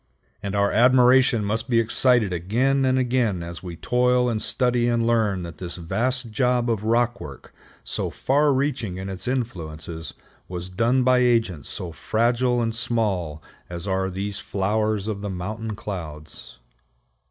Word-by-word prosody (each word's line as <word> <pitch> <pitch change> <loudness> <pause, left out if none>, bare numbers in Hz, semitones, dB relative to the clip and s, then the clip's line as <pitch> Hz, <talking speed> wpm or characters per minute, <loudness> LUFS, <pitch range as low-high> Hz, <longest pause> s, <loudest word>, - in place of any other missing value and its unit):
And 100 -1 -3
our 100 0 +2
admiration 125 -2 +5
must 110 +5 -2
be 115 -2 +4
excited 115 -2 +2
again 125 +10 +1
and 130 0 +2
again 120 -8 +1
as 85 0 -7
we 90 -2 -7
toil 125 +5 +2
and 110 -2 -1
study 120 0 +1
and 120 -1 +1
learn 110 -6 +1
that 85 -1 -9
this 90 -2 -4
vast 120 +8 -2
job 125 0 +1
of 110 -2 -2
rockwork, 115 - -1 0.3
so - - -3
far 145 +2 +2
reaching 130 -8 -1
in 95 +1 -5
its 95 +4 -6
influences, 80 -10 -4 0.3
was 90 0 -5
done 115 +7 +2
by 130 0 +4
agents 115 - +1
so 90 -2 -5
fragile 120 +7 +1
and 115 -1 -1
small 100 - -1 0.3
as 85 +2 -6
are 95 0 0
these 100 +2 -4
flowers 105 +2 -1
of 105 -2 -3
the 105 - -4
mountain 105 +4 -4
clouds. 80 -10 -8
110 Hz, 155 wpm, -24 LUFS, 95-125 Hz, 0.3 s, admiration